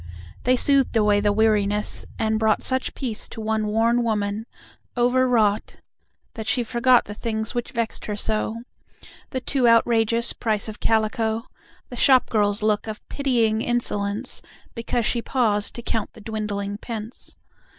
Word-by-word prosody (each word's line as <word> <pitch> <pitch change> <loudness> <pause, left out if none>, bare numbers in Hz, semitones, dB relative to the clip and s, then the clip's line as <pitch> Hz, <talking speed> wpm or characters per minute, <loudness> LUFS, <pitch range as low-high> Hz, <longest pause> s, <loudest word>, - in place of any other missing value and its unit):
They 255 +1 +4
soothed 270 -2 +3
away 210 -1 +3
the 205 0 +2
weariness, 210 -1 +1
and 220 0 0
brought 220 -1 +2
Such 260 0 0
peace 230 -5 -3
to - - -9
one 220 -1 -1
worn 230 +3 +2
woman, 215 -1 -2 0.5
over 250 +2 +3
wrought, 215 -4 +1 0.6
That 220 -1 -7
she 245 +1 +1
forgot 240 +2 +3
the 205 - -7
things 220 0 -3
which 240 -1 -3
vexed 230 -1 -3
her 210 - -2
so: 220 +2 -1 0.7
The 260 - -3
too 255 -1 +1
outrageous 230 0 +3
price 215 -3 0
of 215 - -7
calico, 220 0 0 0.5
The 245 - -8
shop 260 0 +4
girl's 205 -1 +1
look 215 0 +1
of 215 -1 -7
pitying 230 -6 +1
insolence 230 -1 -1 0.3
Because 235 0 -2
she 235 - +1
paused 215 -5 +1
to 235 - -6
count 225 -2 -2
the 220 - -14
dwindling 205 -2 -4
pence. 225 0 -6
220 Hz, 150 wpm, -23 LUFS, 210-240 Hz, 0.7 s, They